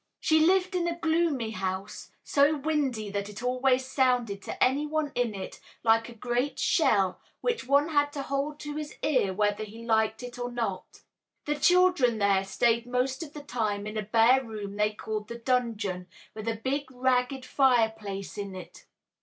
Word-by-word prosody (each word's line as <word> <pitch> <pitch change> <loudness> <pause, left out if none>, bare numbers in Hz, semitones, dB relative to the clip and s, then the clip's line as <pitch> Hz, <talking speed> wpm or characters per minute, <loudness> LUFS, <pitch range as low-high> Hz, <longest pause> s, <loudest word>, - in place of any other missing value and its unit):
She 315 0 +3
lived 370 +3 +3
in 350 -1 0
a 340 0 -2
gloomy 320 -8 0
house, 190 0 -4
so 290 +2 +3
windy 270 -8 -1
that 200 0 -3
it 210 +4 -9
always 255 +1 +2
sounded 250 -6 +1
to - - -2
any 280 +4 +2
one 305 -1 -1
in 240 -5 -1
it 190 - -7 0.2
like 225 0 +3
a 235 - -11
great 245 +4 -1
shell 200 - +2 0.2
which 470 - -1
one 285 +3 +3
had 290 -2 +2
to 280 -2 -4
hold 280 +2 -2
to 295 0 -5
his 305 0 -6
ear 255 -10 +2
whether 205 +2 0
he 225 +2 -10
liked 220 0 +1
it 245 0 -8
or 245 0 -3
not. 225 -6 -4 0.4
The 295 - 0
children 355 -7 +4
there 200 -2 +3
stayed 235 +4 +1
most 250 +3 -1
of 305 -3 -7
the 295 - -8
time 215 -6 -2
in 215 +1 -6
a 215 - 0
bare 230 +5 +4
room 210 -4 -7
they 210 0 +2
called 215 0 -5
"the 235 - -6
dungeon," 225 -7 -1 0.3
with 215 0 -7
a 225 - 0
big 265 +5 -2
ragged 255 +1 0
fireplace 220 -7 +1
in 200 -2 -5
it. 185 - -11
245 Hz, 180 wpm, -28 LUFS, 215-285 Hz, 0.4 s, children